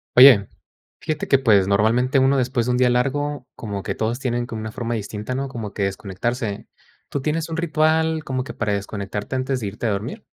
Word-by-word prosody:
Oye, 125 Hz, -6 st, +9 dB, 0.5 s
fíjate 155 Hz, -1 st, -3 dB
que, 135 Hz, -, +5 dB
pues, 105 Hz, -7 st, +4 dB
normalmente, 115 Hz, +7 st, +3 dB
uno 135 Hz, +1 st, +4 dB
después 125 Hz, -2 st, 0 dB
de 125 Hz, -, 0 dB
un 125 Hz, -, +1 dB
día 125 Hz, -1 st, +4 dB
largo, 135 Hz, +2 st, 0 dB
como 100 Hz, -3 st, -5 dB
que -, -, -3 dB
todos 115 Hz, +2 st, -1 dB
tienen 120 Hz, -2 st, -1 dB
como 115 Hz, -2 st, -6 dB
una 110 Hz, 0 st, -5 dB
forma 120 Hz, 0 st, -3 dB
distinta, 105 Hz, +2 st, -4 dB
¿no?, 135 Hz, +1 st, -2 dB
como 115 Hz, -6 st, -6 dB
que 100 Hz, -, -2 dB
de -, -, +3 dB
desconectarse. 100 Hz, +3 st, -4 dB, 0.4 s
¿Tú 140 Hz, -, -2 dB
tienes 160 Hz, +3 st, -2 dB
un 165 Hz, -, -3 dB
ritual 160 Hz, -1 st, +1 dB
como 130 Hz, -1 st, -2 dB
que 130 Hz, -, -8 dB
para 110 Hz, -3 st, -1 dB
desconectarte 100 Hz, +3 st, -4 dB
antes 130 Hz, 0 st, -1 dB
de 110 Hz, -, -3 dB
irte 105 Hz, +4 st, -4 dB
a -, -, +2 dB
dormir? 115 Hz, -, -4 dB
125 Hz, 215 wpm, -22 LUFS, 105-135 Hz, 0.5 s, Oye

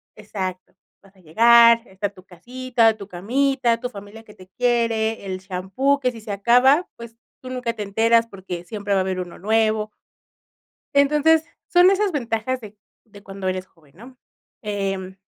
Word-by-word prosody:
exacto, 190 Hz, -3 st, -6 dB, 0.3 s
vas 195 Hz, 0 st, -23 dB
a -, -, -23 dB
llegar, 230 Hz, +7 st, +5 dB
está 190 Hz, +2 st, -4 dB
tu 185 Hz, -2 st, -18 dB
casita, 235 Hz, +4 st, 0 dB
tu 200 Hz, -2 st, -10 dB
camita, 235 Hz, +5 st, 0 dB
tu 245 Hz, -, -4 dB
familia 205 Hz, 0 st, -11 dB
que 210 Hz, -, -16 dB
te 185 Hz, -, -16 dB
quiere, 230 Hz, -3 st, 0 dB
el 185 Hz, -1 st, -4 dB
champú 190 Hz, +10 st, -1 dB
que 255 Hz, -2 st, 0 dB
si 230 Hz, -2 st, -12 dB
se 215 Hz, -1 st, -7 dB
acaba 250 Hz, -, +3 dB
pues 235 Hz, -1 st, -11 dB, 0.3 s
tú 255 Hz, -, -9 dB
nunca 250 Hz, -2 st, -3 dB
te 215 Hz, -, -5 dB
enteras 230 Hz, +3 st, +2 dB
porque 185 Hz, -4 st, -8 dB
siempre 205 Hz, 0 st, -4 dB
va 195 Hz, -, +3 dB
a -, -, +2 dB
haber 185 Hz, 0 st, -2 dB
uno 180 Hz, -1 st, -7 dB
nuevo. 215 Hz, +1 st, +1 dB, 1.1 s
Entonces 300 Hz, +3 st, +3 dB, 0.2 s
son 355 Hz, +1 st, +5 dB
esas 395 Hz, 0 st, +1 dB
ventajas 250 Hz, -2 st, -2 dB
de 215 Hz, -1 st, -12 dB, 0.3 s
de 205 Hz, -2 st, -16 dB
cuando 195 Hz, -1 st, -8 dB
eres 185 Hz, 0 st, -2 dB
joven, 155 Hz, -4 st, -27 dB
¿no? 250 Hz, +5 st, -15 dB, 0.4 s
Em, 195 Hz, -3 st, -4 dB
220 Hz, 170 wpm, -22 LUFS, 195-245 Hz, 1.1 s, llegar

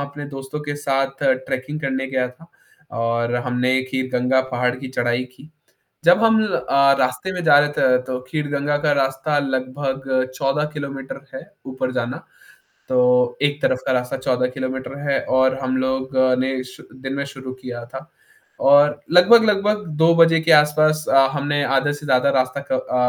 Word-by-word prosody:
अपने 140 Hz, +1 st, -7 dB
दोस्तों 135 Hz, +2 st, -7 dB
के 145 Hz, -1 st, -5 dB
साथ 135 Hz, -1 st, -2 dB, 0.2 s
ट्रैकिंग 145 Hz, +4 st, -4 dB
करने 135 Hz, -1 st, -2 dB
गया 130 Hz, -1 st, -1 dB
था 125 Hz, +7 st, -18 dB, 0.5 s
और 115 Hz, +1 st, -1 dB
हमने 125 Hz, +1 st, 0 dB
खीरगंगा 130 Hz, 0 st, 0 dB
पहाड़ 125 Hz, 0 st, 0 dB
की 130 Hz, 0 st, -8 dB
चढ़ाई 120 Hz, -1 st, -1 dB
की। 140 Hz, +4 st, -17 dB, 0.6 s
जब 175 Hz, +6 st, +5 dB
हम 225 Hz, -1 st, +4 dB
अ, 140 Hz, -8 st, +2 dB
रास्ते 125 Hz, +9 st, -1 dB
में 180 Hz, -1 st, -4 dB
जा 145 Hz, -3 st, +6 dB
रहे 145 Hz, 0 st, +2 dB
थे 125 Hz, -1 st, +4 dB
तो 125 Hz, 0 st, -4 dB
खीरगंगा 145 Hz, -1 st, -1 dB
का 150 Hz, -, +3 dB
रास्ता 135 Hz, +2 st, -1 dB
लगभग 130 Hz, -1 st, -2 dB
14 140 Hz, +3 st, 0 dB
किलोमीटर 140 Hz, -2 st, -7 dB
है -, -, -8 dB, 0.2 s
ऊपर 130 Hz, -1 st, -4 dB
जाना। 125 Hz, 0 st, -4 dB, 0.6 s
तो 130 Hz, -, +2 dB, 0.4 s
एक 145 Hz, 0 st, 0 dB
तरफ़ 130 Hz, -, +1 dB
का 135 Hz, -, 0 dB
रास्ता 125 Hz, +1 st, -2 dB
14 125 Hz, -1 st, 0 dB
किलोमीटर 130 Hz, +1 st, -5 dB
है 140 Hz, -, +2 dB, 0.2 s
और 130 Hz, 0 st, +2 dB
हम 130 Hz, -1 st, -2 dB
लोग 130 Hz, +1 st, -2 dB, 0.2 s
ने 130 Hz, 0 st, -1 dB
शु 130 Hz, 0 st, -14 dB, 0.2 s
दिन 135 Hz, 0 st, -4 dB
में 140 Hz, 0 st, -2 dB
शुरू 135 Hz, -2 st, -9 dB
किया 125 Hz, -2 st, -8 dB
था। 135 Hz, +7 st, -10 dB, 0.6 s
और 145 Hz, +1 st, +5 dB
लगभग-लगभग 210 Hz, +1 st, +4 dB, 0.2 s
2 165 Hz, +1 st, +5 dB
बजे 165 Hz, -1 st, +5 dB
के 165 Hz, +1 st, +2 dB
आस-पास 155 Hz, +1 st, +4 dB
अ, 135 Hz, 0 st, +5 dB
हमने 145 Hz, 0 st, -1 dB
आधे 135 Hz, +2 st, +1 dB
से 145 Hz, +1 st, -9 dB
ज़्यादा 130 Hz, 0 st, +3 dB
रास्ता 130 Hz, +1 st, 0 dB
क -, -, -1 dB
अ 130 Hz, -, -2 dB
135 Hz, 170 wpm, -20 LUFS, 130-145 Hz, 0.6 s, जा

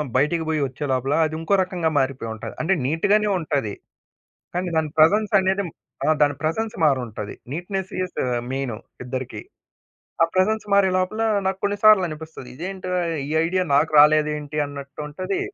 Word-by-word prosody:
బయటికి 150 Hz, +5 st, +2 dB
పోయి 155 Hz, -2 st, 0 dB
ఒచ్చే 135 Hz, +3 st, -6 dB
లోపల 130 Hz, +2 st, 0 dB
అది 155 Hz, 0 st, -3 dB
ఇంకో 165 Hz, +5 st, -1 dB
రకంగా 175 Hz, -3 st, -1 dB
మారిపోయుంటది. 115 Hz, -5 st, -3 dB
అంటే 185 Hz, +5 st, +2 dB
నీట్ 160 Hz, +4 st, 0 dB
గానే 210 Hz, 0 st, +4 dB
ఉంటది. 140 Hz, -10 st, -2 dB, 0.8 s
కానీ 180 Hz, +1 st, -1 dB
దాని 155 Hz, -1 st, +1 dB
ప్రెజెన్స్ 205 Hz, +8 st, +4 dB
అనేది 190 Hz, +1 st, +1 dB, 0.4 s
ఆ! -, -, +2 dB
దాని 145 Hz, -1 st, +4 dB
ప్రెజెన్స్ 220 Hz, +9 st, -1 dB
మారుంటది. 120 Hz, -8 st, -1 dB, 0.2 s
నీట్‌నేస్ 185 Hz, +4 st, -4 dB
ఇస్ 185 Hz, -, -5 dB, 0.4 s
మెయిను 130 Hz, -4 st, -2 dB, 0.3 s
ఇద్దరికీ. 130 Hz, 0 st, -5 dB, 0.8 s
ఆ -, -, +8 dB
ప్రెజెన్స్ 210 Hz, +4 st, +2 dB
మారే 200 Hz, -1 st, +5 dB
లోపల 185 Hz, +5 st, -1 dB, 0.2 s
నాకు 190 Hz, 0 st, 0 dB
కొన్ని 205 Hz, 0 st, +1 dB
సార్లనిపిస్తది. 160 Hz, -10 st, +3 dB
ఇదేంటిరా 185 Hz, +1 st, -3 dB, 0.3 s
ఈ -, -, -6 dB, 0.2 s
ఐడియా 185 Hz, +2 st, 0 dB
నాకు 150 Hz, +3 st, +3 dB
రాలేదేంటి? 150 Hz, 0 st, +4 dB
అన్నట్టుంటది. 145 Hz, -, -5 dB
160 Hz, 145 wpm, -23 LUFS, 145-185 Hz, 0.8 s, ఆ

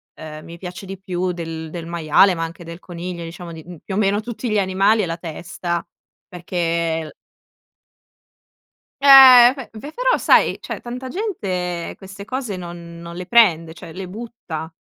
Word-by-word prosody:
ehm, 155 Hz, -1 st, -9 dB
mi 170 Hz, +1 st, -11 dB
piace 180 Hz, +3 st, -8 dB
di 195 Hz, 0 st, -8 dB
più 185 Hz, -1 st, -2 dB
del 165 Hz, -2 st, -6 dB
del 170 Hz, 0 st, -7 dB
maiale, 170 Hz, +3 st, +3 dB
ma 165 Hz, -, -3 dB
anche 165 Hz, +1 st, -7 dB
del 170 Hz, +1 st, -9 dB
coniglio, 175 Hz, -1 st, -7 dB
diciamo, 170 Hz, +1 st, -8 dB
di, 160 Hz, -1 st, -10 dB
mhmm, 175 Hz, 0 st, -10 dB
più 190 Hz, -, -4 dB
o -, -, -1 dB
meno 205 Hz, -1 st, +2 dB
tutti 235 Hz, +2 st, -5 dB
gli 210 Hz, -1 st, +2 dB
animali, 195 Hz, +3 st, +2 dB
è -, -, 0 dB
la 165 Hz, -1 st, -3 dB
testa, 170 Hz, +1 st, -4 dB, 0.5 s
perché 180 Hz, +1 st, -7 dB, 0.4 s
è 160 Hz, -, -5 dB
l 155 Hz, -, -10 dB, 1.9 s
Eh 260 Hz, -3 st, +10 dB
beh. 265 Hz, -4 st, -9 dB
Beh, 290 Hz, +7 st, -9 dB
però -, -, +2 dB
sai, -, -, +4 dB
cioè -, -, -6 dB
tanta 250 Hz, +2 st, -7 dB
gente 185 Hz, -, -3 dB
queste 195 Hz, +1 st, -10 dB
cose 240 Hz, -2 st, -4 dB
non 170 Hz, -1 st, -9 dB
non 170 Hz, 0 st, -9 dB
le 180 Hz, +1 st, -7 dB
prende, 170 Hz, -9 st, +4 dB
cioè 165 Hz, -, -11 dB
le 185 Hz, +2 st, -7 dB
butta, 185 Hz, -7 st, -7 dB
180 Hz, 180 wpm, -20 LUFS, 170-215 Hz, 1.9 s, Eh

